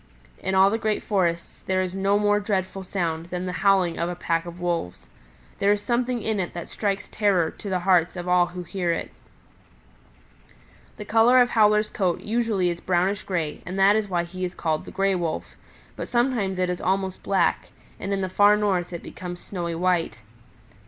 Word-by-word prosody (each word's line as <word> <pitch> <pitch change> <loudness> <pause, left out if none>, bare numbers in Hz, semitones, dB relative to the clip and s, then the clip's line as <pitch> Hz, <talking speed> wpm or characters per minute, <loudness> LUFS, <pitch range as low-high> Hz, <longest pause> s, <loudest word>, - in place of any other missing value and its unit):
In 190 0 -1
all 190 +1 +6
the 225 - 0
great 215 -1 -1
forests 175 -5 -1
there 185 0 0
is 185 -1 -4
no 195 +1 +2
more 205 0 +2
dreadful 195 -2 -2
sound 170 -3 -3
than 180 +1 -4
the 180 - -2
howling 190 -4 +3
of 170 +1 0
a 175 - -4
pack 165 -1 -1
of 170 +1 -9
wolves. 170 - -3 0.5
There 200 - +3
is 205 - +2
something 240 0 0
in 220 -2 0
it 175 -2 -3
that 170 - -6
strikes 200 -2 -2
terror 195 -6 +1
to 205 - -8
the 185 -1 0
hearts 180 -2 +3
of 175 0 -6
all 180 0 +4
who 180 +1 -7
hear 175 0 -2
it. 165 - -3 1.9
"The 210 - -7
color 230 +4 +5
of 245 -1 +4
Howler's 210 -1 +3
coat 185 -4 0
usually 215 -5 0
is 170 - -6
brownish 185 +2 +1
gray 165 -6 -3
and 185 +2 -6
that 195 +2 +5
is 215 -1 0
why 175 -2 0
he 185 +2 -7
is 180 0 -3
called 155 -1 -1
the - - -9
Gray 195 0 +1
Wolf; 170 -3 -3 0.4
but - - -5
sometimes 240 -6 0
it 180 0 +1
is 180 - -4
almost 190 0 -1
black, 190 -3 +1 0.3
and 195 - -4
in 195 -1 0
the 190 - -1
Far 205 +3 +5
North 190 -4 0
it 170 - -6
becomes 175 -1 -7
snowy 170 -3 -4
white. 165 -9 0
185 Hz, 200 wpm, -24 LUFS, 175-205 Hz, 1.9 s, all